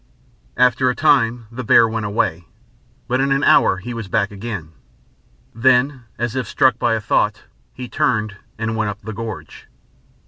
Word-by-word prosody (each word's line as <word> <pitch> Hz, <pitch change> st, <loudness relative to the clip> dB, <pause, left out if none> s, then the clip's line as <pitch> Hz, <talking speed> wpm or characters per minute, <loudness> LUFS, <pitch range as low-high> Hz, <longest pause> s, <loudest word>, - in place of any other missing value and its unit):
After 125 Hz, +1 st, +3 dB
a 125 Hz, -, -1 dB
time 120 Hz, -6 st, +2 dB
the 125 Hz, +2 st, -6 dB
bear 115 Hz, 0 st, +5 dB
went 110 Hz, -1 st, -3 dB
away, 85 Hz, -5 st, -1 dB, 0.6 s
but 125 Hz, +2 st, 0 dB
in 135 Hz, 0 st, 0 dB
an 135 Hz, +1 st, +1 dB
hour 95 Hz, -, +4 dB
he 120 Hz, +6 st, -7 dB
was 115 Hz, -3 st, -6 dB
back 100 Hz, 0 st, 0 dB
again. 100 Hz, -6 st, -6 dB, 0.8 s
Then, 130 Hz, +2 st, +2 dB
as 120 Hz, 0 st, -3 dB
if 130 Hz, -4 st, -2 dB
struck 130 Hz, +4 st, +2 dB
by 115 Hz, -1 st, +2 dB
a -, -, -1 dB
thought, 105 Hz, 0 st, 0 dB, 0.3 s
he 125 Hz, -1 st, -8 dB
turned, 110 Hz, -4 st, -1 dB, 0.2 s
and 110 Hz, 0 st, -2 dB
went 110 Hz, -2 st, -1 dB
up 105 Hz, +1 st, -7 dB
the 110 Hz, -, -7 dB
gorge.... 110 Hz, -1 st, -8 dB
115 Hz, 170 wpm, -19 LUFS, 105-125 Hz, 0.8 s, bear